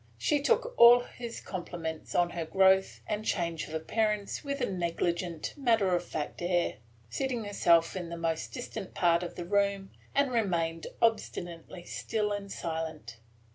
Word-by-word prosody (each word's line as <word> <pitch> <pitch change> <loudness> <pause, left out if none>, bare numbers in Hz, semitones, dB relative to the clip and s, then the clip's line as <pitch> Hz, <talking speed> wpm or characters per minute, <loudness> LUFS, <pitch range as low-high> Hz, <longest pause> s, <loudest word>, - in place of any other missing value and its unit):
She 290 - +1
took 475 - +2
all 240 +1 +9
his 240 -1 -7
compliments 170 -3 -6
on 175 0 +3
her 170 - -3
growth 190 +3 +3
and 210 0 -2
change 170 -7 -1
of 155 - -6
appearance 210 - -1
with 280 -1 -3
a 245 - +1
negligent, 170 -2 -2
matter 225 -9 +2
of 175 - -4
course 150 -2 -2
air, 175 0 0 0.3
seated 245 - -2
herself 170 -5 +3
in 175 -3 -4
the 170 - -5
most 165 -1 -2
distant 190 - -6
part 170 -1 +3
of 175 - -6
the 175 - -5
room, 200 0 +1 0.2
and 280 -2 +3
remained 170 -8 0 0.2
obstinately 175 -6 -1
still 210 +3 -2
and 200 -1 -4
silent. 160 -8 -5
185 Hz, 155 wpm, -30 LUFS, 170-220 Hz, 0.3 s, all